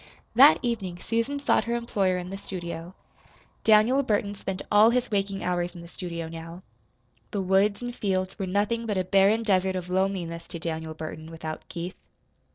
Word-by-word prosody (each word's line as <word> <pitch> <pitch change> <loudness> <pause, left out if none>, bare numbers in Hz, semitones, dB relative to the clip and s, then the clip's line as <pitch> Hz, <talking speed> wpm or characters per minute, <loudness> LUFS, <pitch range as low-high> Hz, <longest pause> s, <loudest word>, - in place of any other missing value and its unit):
That 270 +6 +8
evening 205 -7 -2
Susan 230 +8 -1
sought 280 - +2
her 235 0 -1
employer 200 -6 0
in 180 +1 -5
the 195 - -4
studio. 170 -2 -6 0.7
Daniel 220 +5 +5
Burton 205 -5 0
spent 195 -1 -5
all 210 +2 +7
his 245 0 0
waking 195 -1 -1
hours 175 0 -1
in 175 - -8
the 170 - -10
studio 170 -2 -6
now. 165 +2 -9 0.7
The 200 - -2
woods 195 +4 +2
and 245 0 -4
fields 185 -2 -1
were 195 - -2
nothing 210 +5 0
but 205 -3 -1
a 185 - +2
barren 195 +4 +4
desert 190 -3 +2
of 180 -1 -4
loneliness 180 -3 -1
to - - -6
Daniel 160 -1 -4
Burton 155 0 -7
without 160 -1 -7
Keith. 175 +2 -6
190 Hz, 175 wpm, -27 LUFS, 175-215 Hz, 0.7 s, That